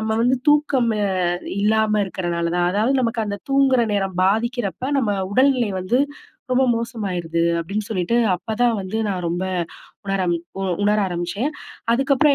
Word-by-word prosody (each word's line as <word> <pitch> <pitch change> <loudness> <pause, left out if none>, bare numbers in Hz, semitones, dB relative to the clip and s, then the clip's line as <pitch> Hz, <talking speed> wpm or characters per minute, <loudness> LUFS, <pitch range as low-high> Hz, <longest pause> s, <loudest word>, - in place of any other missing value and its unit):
நம்ம 220 0 -2
வந்து 250 +2 +3
தூக்கம் 290 -5 +3
அ 200 - +1 0.5
இல்லாம 215 0 +2
இருக்கிறனால 175 -2 -2
தான், 175 0 +2
அதாவது 220 +7 +2
நமக்கு 230 -1 0
அந்த 205 - -3
தூங்குகிற 270 -2 +4
நேரம் 195 -2 -1
பாதிக்கிறப்ப, 225 +2 0 0.2
நம்ம 225 -5 0 0.2
உடல்நிலை 255 -4 +3
வந்து 230 +8 +1 0.5
ரொம்ப 255 +1 +3
மோசமாயிருது, 195 -8 -3 0.2
அப்பிடின்னு 200 +5 -3
சொல்லிட்டு 205 +2 0 0.2
அப்பதான் 225 +6 0
வந்து 190 +3 -4
நான் 185 -3 -2
ரொம்ப 175 +2 -1 0.6
உணர 195 -1 0 0.4
உ - - -2 0.2
உணர 210 +1 +3
ஆரம்பிச்சேன், 180 +8 -2 0.4
அதுக்கப்புறம் 275 +3 +3
215 Hz, 140 wpm, -21 LUFS, 185-245 Hz, 0.6 s, தூங்குகிற